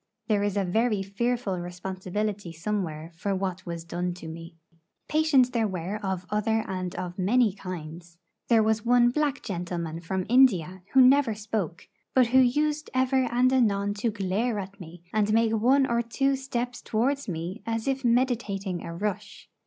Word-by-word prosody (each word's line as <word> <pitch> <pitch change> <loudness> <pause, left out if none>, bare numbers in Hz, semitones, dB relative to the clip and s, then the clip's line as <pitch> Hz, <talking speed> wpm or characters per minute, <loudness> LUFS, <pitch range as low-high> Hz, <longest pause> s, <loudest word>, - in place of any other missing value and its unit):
There 210 -2 +2
is 205 0 -1
a 200 - +2
very 215 +2 +1
fearful 205 -1 -1
responsibility 185 +2 -4
somewhere 165 -3 -3
for 195 +4 -2
what 190 -1 -3
was 170 -1 -5
done 175 +1 -3
to 170 -2 -9
me. 165 +1 -9 0.5
Patients 300 -5 +3
there 230 -3 +1
were 185 +1 -4
of 190 -2 -3
other 220 +1 +1
and 185 -1 -4
of 180 +1 -5
many 220 +3 +3
kinds. 170 -2 -8 0.3
There 225 -2 +5
was 215 0 +1
one 240 0 +4
black 290 0 -1
gentleman 170 -4 -4
from 185 +2 -3
India 190 -8 +4
who 265 - +7
never 260 -3 +5
spoke; 210 -5 -4 0.3
but 260 -1 +6
who 260 +2 +5
used 295 +4 +2
ever 260 0 +2
and 250 +2 +3
anon 205 -5 +2
to 230 - +1
glare 210 +3 -1
at 200 0 -6
me, 170 -1 -11
and 215 -1 +2
make 225 0 +3
one 255 +5 +4
or 235 -2 +1
two 270 +4 0
steps 250 -2 -4
towards 275 +6 0
me 175 +4 -4
as 225 +1 -2
if 270 0 -1
meditating 230 -7 0
a 170 - -6
rush. 205 +1 -5
210 Hz, 170 wpm, -27 LUFS, 180-245 Hz, 0.5 s, who